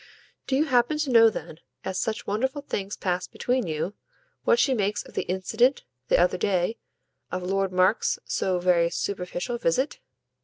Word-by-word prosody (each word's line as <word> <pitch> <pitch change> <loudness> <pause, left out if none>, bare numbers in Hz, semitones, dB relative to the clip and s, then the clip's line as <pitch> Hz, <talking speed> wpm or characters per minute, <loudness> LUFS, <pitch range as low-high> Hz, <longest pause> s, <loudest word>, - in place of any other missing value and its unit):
"Do 265 - +1
you 295 +3 +3
happen 250 +1 +2
to 300 -3 -1
know 230 -1 +8
then, 165 -6 -7 0.3
as 190 0 -2
such 220 -1 -2
wonderful 265 +7 -1
things 200 -7 -4
pass 180 -1 -1
between 250 -4 -1
you, 160 +5 -2 0.5
what 475 - +5
she 275 - +3
makes 210 -3 0
of - - -15
the - - -3
incident, 220 +8 +1 0.2
the - - +4
other 180 +1 +2
day, 190 +3 0 0.5
of 185 0 -3
Lord 195 +1 0
Mark's 185 +4 +2
so 185 -1 0
very 175 -1 +3
superficial 195 +6 -3
visit? 255 - 0
200 Hz, 165 wpm, -26 LUFS, 180-245 Hz, 0.5 s, know